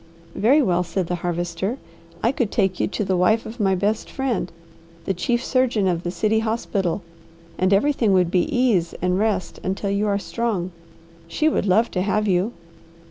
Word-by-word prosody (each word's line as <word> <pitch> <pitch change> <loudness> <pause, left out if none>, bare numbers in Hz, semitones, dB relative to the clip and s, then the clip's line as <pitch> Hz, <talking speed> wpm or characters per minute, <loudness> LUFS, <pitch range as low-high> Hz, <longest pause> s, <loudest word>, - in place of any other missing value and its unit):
"Very 270 +9 +4
well," 180 -5 +2
said 180 +1 -2
the 180 - -3
Harvester. 175 +6 -2 0.5
"I 230 - +4
could 245 -6 -1
take 190 -4 +1
you - - +1
to 200 +2 -3
the 190 0 +1
wife 215 +6 +2
of 230 +3 -8
my 195 -2 +2
best 205 +4 -1
friend, 250 -9 -2 0.5
the 195 - 0
chief 240 +7 -1
surgeon 245 -6 +2
of 175 -2 0
the 175 - -3
city 215 +4 +1
hospital, 210 -5 -1 0.6
and 185 +1 +2
everything 225 +1 +3
would 180 -2 +3
be 180 -2 +2
ease 220 -10 +1
and 180 +1 0
rest 210 -4 -1
until 195 +1 -2
you 200 +1 0
are 200 -1 +1
strong; 200 -4 -2 0.6
she 305 - 0
would 295 - +1
love 215 +5 +3
to 180 - -1
have 210 +2 0
you." 190 +3 +1
200 Hz, 185 wpm, -22 LUFS, 180-225 Hz, 0.6 s, Very